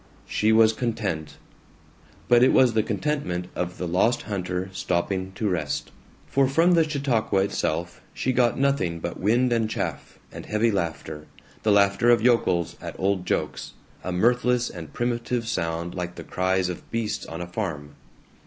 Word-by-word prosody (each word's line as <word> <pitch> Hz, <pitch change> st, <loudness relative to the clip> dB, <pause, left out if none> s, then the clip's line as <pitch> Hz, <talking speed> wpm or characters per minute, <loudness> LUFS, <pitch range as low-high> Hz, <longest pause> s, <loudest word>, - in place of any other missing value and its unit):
She 110 Hz, +1 st, +1 dB
was 110 Hz, 0 st, +5 dB
content. 110 Hz, -10 st, -3 dB, 0.9 s
But 120 Hz, -1 st, +5 dB
it 130 Hz, -, +6 dB
was 125 Hz, -3 st, +5 dB
the 110 Hz, -, +3 dB
contentment 105 Hz, -, -2 dB
of 90 Hz, 0 st, -3 dB
the 90 Hz, -, -3 dB
lost 95 Hz, +8 st, +2 dB
hunter 95 Hz, -2 st, -3 dB
stopping 95 Hz, +1 st, -1 dB
to 110 Hz, -, -2 dB
rest. 90 Hz, -4 st, -2 dB, 0.3 s
For 135 Hz, -1 st, +2 dB
from 165 Hz, +6 st, +3 dB
the 170 Hz, -2 st, +5 dB
Chautauqua 125 Hz, -9 st, +1 dB
itself 85 Hz, -3 st, -2 dB
she 130 Hz, -, -1 dB
got 120 Hz, -1 st, +2 dB
nothing 135 Hz, -12 st, +1 dB
but -, -, -5 dB
wind 120 Hz, +5 st, +2 dB
and 115 Hz, -2 st, +1 dB
chaff -, -, -4 dB
and -, -, -9 dB
heavy 110 Hz, +2 st, +2 dB
laughter, 80 Hz, -5 st, -4 dB, 0.3 s
the 110 Hz, -, +2 dB
laughter 100 Hz, +3 st, +4 dB
of 120 Hz, -1 st, +6 dB
yokels 115 Hz, -8 st, +2 dB
at -, -, -7 dB
old 95 Hz, -1 st, 0 dB
jokes, -, -, -2 dB, 0.3 s
a 90 Hz, -, -3 dB
mirthless 120 Hz, +5 st, +2 dB
and 80 Hz, -5 st, -9 dB
primitive 120 Hz, +1 st, -2 dB
sound 85 Hz, -4 st, -2 dB
like 90 Hz, -1 st, -4 dB
the -, -, -8 dB
cries 95 Hz, 0 st, 0 dB
of 90 Hz, -1 st, -7 dB
beasts 115 Hz, -2 st, -3 dB
on 80 Hz, -, -6 dB
a 85 Hz, -, -4 dB
farm. 85 Hz, -7 st, -4 dB
100 Hz, 160 wpm, -25 LUFS, 90-120 Hz, 0.9 s, it